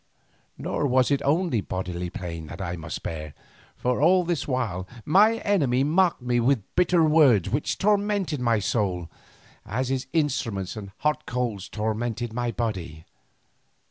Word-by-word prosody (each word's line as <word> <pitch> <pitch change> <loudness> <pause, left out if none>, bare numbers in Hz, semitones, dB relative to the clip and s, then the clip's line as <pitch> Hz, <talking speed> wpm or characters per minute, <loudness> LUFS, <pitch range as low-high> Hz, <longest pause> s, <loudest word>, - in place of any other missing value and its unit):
Nor 145 - -1
was 130 +1 +3
it 140 - +2
only 155 - +1
bodily 90 -2 -4
pain 85 -3 -6
that 85 - -9
I 90 -2 -3
must 80 -2 -6
bear, 75 -2 -5 0.4
for 125 0 0
all 185 0 +5
this 170 -4 -2
while 110 -9 -2 0.2
my 210 +7 +5
enemy 140 - +2
mocked 170 -1 +2
me 125 -1 +1
with 120 -2 +2
bitter 180 -2 +4
words, 150 - +4
which 140 +4 -1
tormented 205 -6 +1
my 115 -2 +3
soul 95 -5 -1 0.5
as 125 +4 -2
his 135 0 -2
instruments 115 - -1
and 105 -3 -7 0.2
hot 150 0 +1
coals 120 -6 -2
tormented 110 +1 -2
my 120 0 -1
body. 90 -10 -4
120 Hz, 145 wpm, -25 LUFS, 95-150 Hz, 0.5 s, all